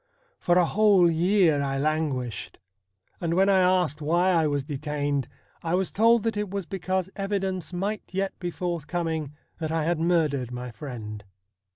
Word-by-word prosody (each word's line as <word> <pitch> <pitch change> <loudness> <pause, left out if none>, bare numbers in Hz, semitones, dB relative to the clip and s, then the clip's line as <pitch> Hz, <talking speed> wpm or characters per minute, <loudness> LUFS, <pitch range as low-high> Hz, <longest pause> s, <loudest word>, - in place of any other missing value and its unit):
For 175 0 +2
a 180 - +5
whole 195 -2 +4
year 170 -2 +3
I 135 -1 -1
languished, 140 -7 -2 0.6
and 170 -1 -1
when 195 +2 +4
I 195 -1 +5
asked 180 -5 +2
why 175 +5 +2
I 165 -3 +3
was 145 -2 -1
detained 145 -1 -2 0.3
I 165 +1 0
was 190 0 0
told 230 +1 +4
that 225 -1 0
it 210 -1 -2
was 195 -1 -3
because 190 0 -2
evidence 195 -3 -2
might 195 +4 -2
yet 195 +1 -1
be 175 - -3
forthcoming 165 -3 -3 0.2
that 160 -1 -3
I 160 -1 0
had 170 +1 0
murdered 155 -7 +1
my 125 0 -6
friend. 110 -5 -7
170 Hz, 165 wpm, -26 LUFS, 145-190 Hz, 0.6 s, a